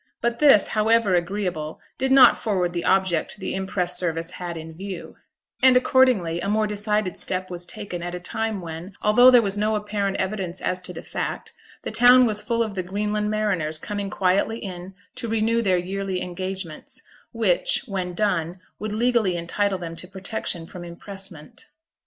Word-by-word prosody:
But 235 0 -1
this, 275 -9 +6
however 220 -2 +3
agreeable, 175 -3 -2 0.2
did 265 0 +1
not 265 -3 +8
forward 185 -5 -1
the 170 - -2
object 190 -2 +1
the 195 - -4
impress 180 -2 0
service 165 -1 -2
had 175 -2 -6
in 160 0 -8
view; 190 +3 -8 0.4
and, 260 -1 +7
accordingly, 250 -10 +3
a 200 - -2
more 215 +1 +2
decided 210 -2 -1
step 185 0 -3
was 175 0 -6
taken 180 -2 -6
at 175 +1 -4
a - - -5
time 220 +2 -3
when, 165 +3 -8
although 245 +4 +7
there 245 -2 +6
was 200 0 -1
no 215 +1 +1
apparent 205 -2 -2
evidence 190 -2 -3
as 185 0 -2
to 180 - -4
the 165 - -8
fact, - - -5 0.3
the - - -4
town 245 +1 +7
was 210 -2 +1
full 230 +2 0
of 215 -2 -5
the 190 - -2
Greenland 210 +3 -2
mariners 195 -8 0
coming 205 +3 -4
quietly 195 +4 +1
in 185 -3 -8 0.2
to 235 -3 -6
renew 225 +1 +1
their 190 -5 +2
yearly 190 +1 -3
engagements, 185 - -5 0.3
which, 225 0 +2
when 185 -5 -4
done, 180 -3 -1 0.2
would 215 0 -4
legally 225 -5 +2
entitle 190 +3 -1
them 165 -2 -7
to 180 - -7
protection 190 -2 -4
from 175 +1 -9
impressment. 195 - -9
195 Hz, 175 wpm, -23 LUFS, 180-215 Hz, 0.4 s, not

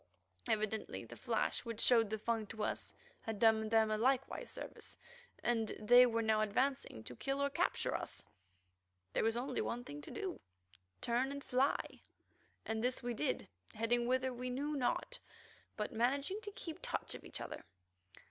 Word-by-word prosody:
Evidently 215 0 0
the - - -10
flash - - 0
which 230 -2 -5
showed 230 -4 +5
the 220 - -1
Fung 220 0 -1
to 215 +1 -4
us - - -1 0.3
had 225 -2 -4
done 220 0 +4
them 220 -1 +4
a 215 - +1
like 260 +2 +4 0.2
service, - - -7 0.5
and 225 -2 +2
they 245 +4 +8
were 230 -1 +1
now 220 -1 +3
advancing 215 - 0
to 125 - -7
kill 275 - -1
or 280 0 +1
capture 345 +5 +1
us. - - -3 0.9
There - - +2
was 225 +1 +2
only 255 +1 -1
one 240 +1 -2
thing 145 -9 -7
to - - -9
do—turn 95 - -4
and 280 0 -5
fly—and 250 -3 -2
this 250 +1 0
we 240 0 -1
did, 265 +4 -1 0.3
heading 235 +2 +2
whither 260 +1 +2
we 250 +1 -4
knew 285 +4 -1
not, 285 - 0 0.6
but 210 - -2
managing 280 - +1
to 415 - -6
keep 325 -6 -6
touch - - -2
of - - -8
each - - -6
other. - - -6
235 Hz, 165 wpm, -37 LUFS, 220-265 Hz, 0.9 s, they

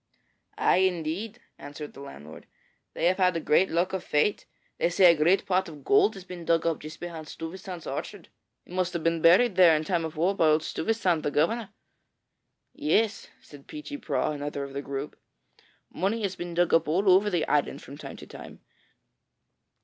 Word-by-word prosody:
'Ay, - - +3
indeed,' 185 +5 -1 0.2
answered 145 +1 -9
the - - -13
landlord; 80 - -11 0.5
'they - - -1
have 180 +2 +3
had 180 -3 +1
great 190 +5 +3
luck 175 +3 0
of 190 - -5
late. 150 +8 +1 0.3
They - - +2
say 175 0 +6
a - - -3
great 170 +6 +2
pot 185 -1 0
of 150 -3 -12
gold 210 - +3
has 190 - -9
been 180 -2 -9
dug 165 0 +1
up 165 -2 0
just 155 +1 -10
behind 165 -3 -7
Stuyvesant's 180 +2 -8
orchard. - - -6 0.4
It - - -14
must 185 -1 -1
have 170 - -3
been 165 -1 +1
buried 185 +5 +5
there 175 -4 +7
in 155 - -1
time 170 0 -1
of 160 -1 -6
war 175 +5 +2
by 165 - +3
old 155 0 +3
Stuyvesant, 180 -2 0
the - - -1
governor.' 195 +9 0 1.0
'Yes,' 225 -8 0
said 145 -2 -15
Peechy 300 -1 -7
Prauw, - - -1
another 145 -1 -4
of 140 0 -8
the 140 - -3
group. 140 +1 -6 0.7
'Money 210 +4 -1
has 190 -2 -2
been 175 -1 -6
dug 175 0 +2
up 165 0 +4
all 185 +6 0
over 190 +3 +5
the 175 -5 -1
island 145 -1 0
from 140 - -10
time 150 - -9
to - - -11
time. - - -12
170 Hz, 190 wpm, -27 LUFS, 155-190 Hz, 1.0 s, there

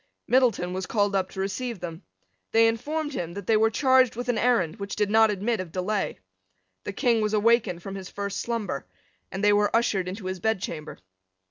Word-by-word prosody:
Middleton 230 -9 +2
was 185 0 -4
called 205 -2 +1
up 190 -1 0
to - - -9
receive 200 +4 -3
them. 170 0 -7 0.5
They 225 0 +6
informed 295 +7 -2
him 170 -6 -4
that 200 -2 -6
they 225 - +3
were 220 +1 +4
charged 260 +1 +3
with 245 +1 -4
an 240 - +1
errand 230 -8 +2
which 200 -1 -5
did 210 -1 0
not 220 0 +6
admit 210 +3 -1
of 185 -3 -5
delay. 195 +4 -2 0.7
The - - -3
King 235 0 +2
was 215 0 0
awakened 215 -5 +2
from 195 - -6
his 190 -2 -7
first 200 -1 -4
slumber; 230 -3 -3 0.4
and 195 +2 -4
they 205 0 +5
were 205 0 +3
ushered 200 -5 +1
into 190 +2 -6
his 185 0 -3
bedchamber. 180 -6 -3
210 Hz, 200 wpm, -26 LUFS, 190-230 Hz, 0.7 s, They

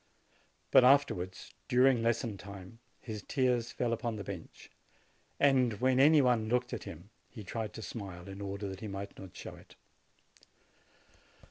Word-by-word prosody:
But - - +8
afterwards, 125 -10 +2
during 125 -1 +4
lesson 115 -2 0
time, 100 +2 -11 0.2
his 110 -3 -6
tears 125 -3 +1
fell 120 -2 -1
upon 115 -1 -2
the 105 - -5
bench, 95 -4 -9 0.7
and 130 -4 +4
when 130 +1 +3
any 150 +1 +7
one 120 -4 +2
looked 125 +1 0
at - - -5
him, - - -10 0.2
he 110 - -9
tried 110 +3 -4
to 110 - -7
smile, 95 -6 -7
in 100 +1 -8
order 100 +1 -4
that 95 -1 -6
he 110 - -6
might 100 0 -6
not 95 -2 -11
show - - -7
it. - - -17
115 Hz, 155 wpm, -32 LUFS, 100-125 Hz, 0.7 s, But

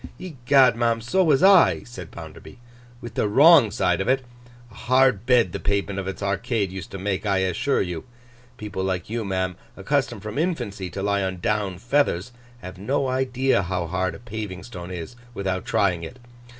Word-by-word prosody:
'Egad, 135 -7 +3
ma'am, 115 -1 +1
so 180 +12 +1
was 150 -2 +3
I,' 195 -3 +6
said 95 -9 -10
Bounderby, 80 -2 -11 0.4
'—with 120 -1 -8
the 110 - 0
wrong 140 +2 +7
side 90 -2 0
of 95 - -3
it. 130 0 +1 0.5
A - - -16
hard 125 -2 +2
bed 120 -8 +4
the - - -4
pavement 100 -1 -1
of 95 - -5
its 95 +1 -5
Arcade 100 0 -1
used 95 -2 -7
to - - -7
make, 95 +1 -2
I 100 -2 +1
assure 95 +10 0
you. 90 0 -5 0.5
People 100 -3 -5
like 95 +1 -3
you, 115 0 -2
ma'am, 95 -2 -2 0.2
accustomed 120 0 -1
from 110 +5 -4
infancy 105 - -2
to 95 +2 -5
lie 100 0 +1
on 95 -1 -2
Down 100 0 -1
feathers, 125 -4 0 0.3
have 90 0 -9
no 135 +6 -1
idea 130 -2 +1
how 90 -1 -2
hard 95 0 -2
a - - -11
paving 110 -5 -6
stone 90 -7 -9
is, 90 +5 -7 0.2
without 95 -2 -2
trying 90 -4 +1
it. 85 +9 -8
105 Hz, 185 wpm, -23 LUFS, 95-125 Hz, 0.5 s, wrong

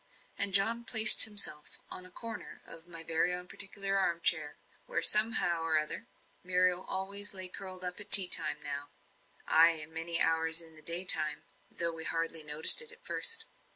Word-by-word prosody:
And 200 0 0
John 230 +4 0
placed 220 -2 +6
himself 200 -9 -2
on 185 - -11
a - - -20
corner 230 +5 -12
of 165 +1 -13
my 165 -1 -11
own 180 +2 -4
particular 195 +1 -3
armchair, 170 -4 -3 0.3
where, - - -5
somehow 210 -6 +3
or 165 -1 -2
other, 155 0 -7 0.4
Muriel 180 0 -1
always 200 +2 -6
lay 185 -1 -1
curled 185 0 -10
up 180 +1 -7
at 205 - -9
tea 190 -3 +9
time - - -2
now 145 0 -9 0.6
(ay, 165 +1 +2
and 155 +1 -16
many 165 +1 -1
hours 160 0 -2
in 165 -1 -13
the 155 - -14
day 170 +3 -5
time, 155 -4 +4 0.3
though 170 -1 -5
we 160 0 -10
hardly 165 -1 -5
noticed 150 - +5
it 470 0 -8
at 480 +1 -21
first). 455 -2 -3
180 Hz, 175 wpm, -28 LUFS, 165-195 Hz, 0.6 s, tea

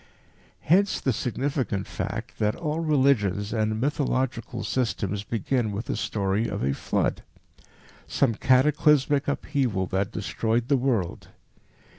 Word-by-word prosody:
Hence 190 +5 +3
the 130 - 0
significant 125 -4 -2
fact - - -5
that 105 0 +1
all 155 -1 -2
religions 130 - +2
and 110 -1 0
"mythological" 130 -3 -1
systems 105 -5 -1
begin 115 +1 -1
with 105 +3 -4
a - - -1
story 100 +2 -1
of - - -3
a 70 +1 +1
flood - - -1 0.9
some 130 -5 +2
cataclysmic 140 +3 +3
upheaval 130 -8 0
that 95 +2 -1
destroyed 115 +3 -1
the 140 - +4
world. 120 -9 -1
120 Hz, 120 wpm, -26 LUFS, 105-140 Hz, 0.9 s, the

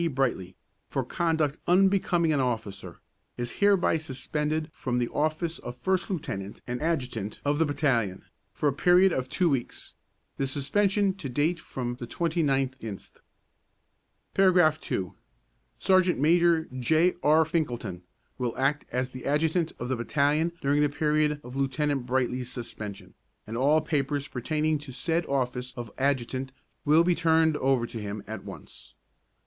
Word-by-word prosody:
Brightly, 105 -9 -1 0.3
for - - -1
conduct 160 -3 0
unbecoming 180 -3 +3
an 145 - +1
officer, 110 -8 -3 0.4
is 120 0 -2
hereby 200 -5 +4
suspended 155 +2 -3
from 125 -2 -2
the 120 -1 0
office 155 +2 -1
of 120 0 -8
first 190 +8 0
lieutenant 100 - -4
and 125 0 -4
adjutant 125 -10 -2
of 145 +1 +1
the 160 - +3
battalion, 125 -10 0 0.3
for 110 +10 -1
a 140 - +2
period 180 +5 +5
of 130 0 -2
two 170 +6 +1
weeks, 135 -6 -2 0.4
the 135 - 0
suspension 195 +9 +1
to 185 -8 -6
date 150 +7 +1
from 120 -5 -5
the 120 - -6
29th 135 -5 0
inst. 105 -4 -8 1.1
Paragraph 180 -5 +4
II. 90 -2 -1 0.7
Sergeant 185 -1 +3
Major 165 +2 +4
J. 160 +8 +3
R. 155 +2 +5
Finkelton 120 - -2 0.4
will 120 -2 -2
act 140 +3 +1
as 125 +1 -2
adjutant 155 +5 0
of 120 - -4
the 130 - 0
battalion 145 +7 +1
during 140 +1 +2
the 150 - +3
period 150 0 +1
of 125 +1 -9
Lieutenant 135 -1 0
Brightly's 125 -1 -1
suspension, 105 -4 -7 0.3
and 110 - -6
all 145 +6 +3
papers 145 -1 -1
pertaining 155 +4 -1
to 145 -2 -9
said 165 +6 -1
office 125 -2 -2
of 120 -3 -6
adjutant 130 -1 -1 0.3
will 155 +3 +6
be 175 +1 +3
turned 160 -2 +3
over 130 -3 +2
to 115 -1 -7
him 105 0 -5
at 110 +1 -7
once. - - -11
145 Hz, 145 wpm, -27 LUFS, 125-160 Hz, 1.1 s, will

